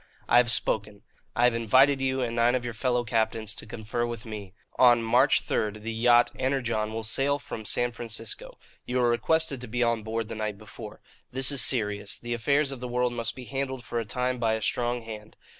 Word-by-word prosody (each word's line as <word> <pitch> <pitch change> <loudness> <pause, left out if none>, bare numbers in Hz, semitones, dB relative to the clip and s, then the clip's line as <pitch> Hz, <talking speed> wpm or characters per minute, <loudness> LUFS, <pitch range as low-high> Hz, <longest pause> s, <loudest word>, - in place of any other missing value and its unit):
"I 120 - +5
have 120 -1 +5
spoken. 105 -3 -1 0.3
I 120 - +2
have 125 -1 +5
invited 130 +5 +4
you, 130 0 0
and 115 -2 -2
nine 120 +1 +3
of 125 -1 -2
your 120 - -4
fellow 125 +1 0
captains, 110 -2 -1
to 110 - -9
confer 110 +2 -3
with 120 -1 -4
me. 105 -4 -8 0.2
On 120 -2 +6
March 125 +5 +4
third 105 0 -2
the 115 0 -3
yacht 120 +1 +4
Energon 120 -5 0
will 115 0 -4
sail 135 +6 +1
from 110 -6 -8
San 120 +3 0
Francisco. 115 -2 -6 0.3
You 125 +1 -1
are 120 - +3
requested 140 +2 +1
to 125 - -5
be 120 +2 0
on 115 -1 +1
board 110 +1 -3
the 115 - -6
night 110 -2 -3
before. 110 +1 -11 0.3
This 130 +2 0
is 140 - +3
serious. 105 -4 +1
The 120 0 -4
affairs 140 +5 +1
of 135 - -6
the 125 - -5
world 125 0 0
must 115 -1 -2
be 130 - -8
handled 135 -1 -3
for 120 - -2
a - - -2
time 125 +3 -2
by 115 -2 +1
a 110 - -4
strong 120 0 0
hand. 110 -1 -9
120 Hz, 215 wpm, -27 LUFS, 110-125 Hz, 0.3 s, On